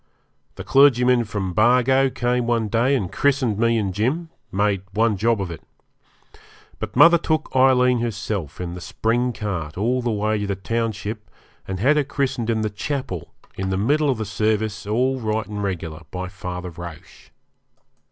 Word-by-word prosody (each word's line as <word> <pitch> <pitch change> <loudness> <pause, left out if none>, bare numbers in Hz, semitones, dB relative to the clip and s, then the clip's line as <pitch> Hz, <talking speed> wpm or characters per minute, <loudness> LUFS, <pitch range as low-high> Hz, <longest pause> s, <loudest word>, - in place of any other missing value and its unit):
The - - -7
clergyman 125 -3 +4
from 100 -3 -3
Bargo 125 +6 +4
came 125 -1 -1
one 115 -3 +1
day 120 +6 +2
and 95 -9 -2
christened 130 -7 +1
me 115 0 +3
and 100 -4 -1
Jim 140 - -1 0.2
made 100 -1 +1
one 110 0 +2
job 115 +3 +1
of 95 -3 -3
it. 85 - -8 1.2
But - - -6
mother 170 0 +7
took 155 -4 -2
Aileen 125 -1 +4
herself 105 - -3
in 90 -1 -4
the 90 - -8
spring 115 +5 0
cart 90 -9 -4
all 120 +6 +1
the 120 - -1
way 105 0 0
to 105 - -2
the 100 - -1
township 110 +1 -3 0.4
and 95 -1 -4
had 140 +8 +3
her 150 - +3
christened 135 -4 -2
in 110 -1 +1
the 110 -1 -1
chapel, 105 - -4 0.2
in 95 0 -3
the 95 - 0
middle 145 +9 +2
of 130 - +1
the 110 - -3
service 105 +1 -1
all 130 +5 +1
right 110 -1 -1
and 105 -1 -5
regular, 85 -5 -4
by 90 +2 -5
Father 90 -2 -6
Roche. 85 -1 -11
110 Hz, 170 wpm, -22 LUFS, 100-125 Hz, 1.2 s, mother